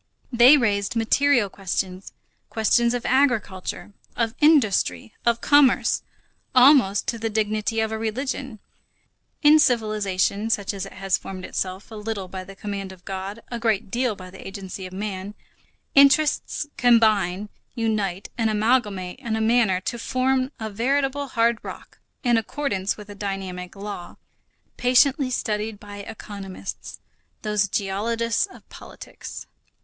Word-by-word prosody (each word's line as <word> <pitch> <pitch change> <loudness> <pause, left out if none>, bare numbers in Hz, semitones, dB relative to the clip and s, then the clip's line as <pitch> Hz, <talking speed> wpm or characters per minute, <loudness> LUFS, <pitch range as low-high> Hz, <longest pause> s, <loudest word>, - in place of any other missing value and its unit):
They 250 +4 +8
raised 205 -4 0
material 240 +1 +3
questions, 190 -1 -4 0.4
questions 235 +2 +2
of 245 - -4
agriculture, 230 -8 0 0.2
of 230 -1 0
industry, 215 - +3
of 235 0 +2
commerce, 285 -3 +4 0.5
almost 250 -6 +6
to 230 - -3
the 225 0 -1
dignity 215 0 -1
of 220 0 -1
a 220 - -3
religion. 260 +2 -3 0.9
In 300 +1 +7
civilization, 215 -4 +1
such 205 -3 0
as 195 -1 -5
it - - -12
has 195 0 0
formed 185 -1 -7
itself, 190 +3 -4
a - - -8
little 210 -2 -4
by 185 0 -6
the 195 +1 -12
command 195 -1 -5
of 180 -1 -15
God, 195 +3 -5
a 235 - -3
great 220 -4 0
deal 245 -2 0
by 185 -1 -11
the 190 - -11
agency 195 -1 -7
of 185 - -13
man, 200 0 -5 0.6
interests 280 +2 +4
combine, 215 -6 +3 0.3
unite, 210 -5 -1
and 225 -1 +2
amalgamate 210 -4 0
in 235 -5 -3
a - - -1
manner 220 -4 +3
to 235 +5 -4
form 255 +2 0
a 220 -1 -4
veritable 275 +5 0
hard 230 -2 +1
rock, - - -10 0.2
in 240 -2 +3
accordance 205 -5 -2
with 210 -1 -10
a 205 - -9
dynamic 195 -3 -5
law, 200 -3 -7 0.6
patiently 255 +2 +3
studied 215 -3 -2
by 205 -1 -10
economists, 200 -2 -8 0.4
those 210 -1 +1
geologists 225 - -1
of 380 - -16
politics. - - -10
215 Hz, 140 wpm, -24 LUFS, 195-240 Hz, 0.9 s, They